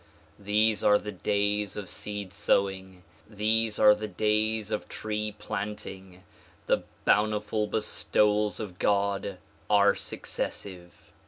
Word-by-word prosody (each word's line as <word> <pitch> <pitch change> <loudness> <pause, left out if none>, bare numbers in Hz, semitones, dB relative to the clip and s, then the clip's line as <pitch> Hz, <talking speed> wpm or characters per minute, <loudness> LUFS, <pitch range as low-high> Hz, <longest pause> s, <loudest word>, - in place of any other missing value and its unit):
These 105 +2 +2
are 105 - +6
the 105 - -6
days 105 +2 -1
of 100 -2 -5
seed 100 -2 -5
sowing. 95 -2 0 0.3
These 110 +1 +1
are 105 0 +7
the 105 +1 -4
days 110 +2 0
of 105 - -3
tree 105 -1 -3
planting. 95 -2 -6 0.4
The - - +1 0.2
bountiful 105 0 +2
bestowals 105 0 +1
of 95 -5 -7
God 100 -1 0 0.3
are 100 -1 +5
successive. 90 -3 -5
105 Hz, 110 wpm, -28 LUFS, 100-105 Hz, 0.4 s, are